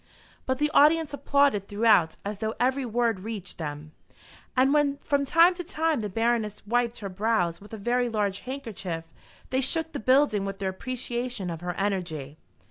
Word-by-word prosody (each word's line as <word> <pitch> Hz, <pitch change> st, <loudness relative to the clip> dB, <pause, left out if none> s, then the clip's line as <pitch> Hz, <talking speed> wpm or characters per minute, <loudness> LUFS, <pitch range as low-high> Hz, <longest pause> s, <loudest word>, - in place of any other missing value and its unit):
But 260 Hz, 0 st, +1 dB
the 300 Hz, +2 st, 0 dB
audience 310 Hz, +1 st, +4 dB
applauded 280 Hz, -8 st, +2 dB
throughout 205 Hz, -6 st, +3 dB
as 205 Hz, 0 st, -4 dB
though 220 Hz, 0 st, -2 dB
every 260 Hz, +1 st, +1 dB
word 230 Hz, -3 st, +1 dB
reached 200 Hz, -3 st, -6 dB
them; 150 Hz, -1 st, -6 dB, 0.7 s
and 265 Hz, +2 st, +4 dB
when 290 Hz, -2 st, +2 dB
from 280 Hz, 0 st, 0 dB
time 335 Hz, +5 st, +5 dB
to 355 Hz, 0 st, -6 dB
time 320 Hz, -, 0 dB
the 210 Hz, -, -3 dB
Baroness 225 Hz, 0 st, -1 dB
wiped 240 Hz, +1 st, 0 dB
her 200 Hz, -, -4 dB
brows 185 Hz, -3 st, 0 dB
with 205 Hz, -, -14 dB
a 220 Hz, -, -6 dB
very 245 Hz, +3 st, 0 dB
large 205 Hz, -3 st, -1 dB
handkerchief, 220 Hz, -11 st, -5 dB, 0.5 s
they 260 Hz, 0 st, +2 dB
shook 320 Hz, +4 st, +1 dB
the -, -, -4 dB
building 255 Hz, -4 st, +3 dB
with 195 Hz, 0 st, -4 dB
their 195 Hz, -1 st, -2 dB
appreciation 240 Hz, -2 st, -3 dB
of 165 Hz, 0 st, -6 dB
her 175 Hz, 0 st, -4 dB
energy. 170 Hz, -8 st, -3 dB
230 Hz, 175 wpm, -27 LUFS, 195-265 Hz, 0.7 s, time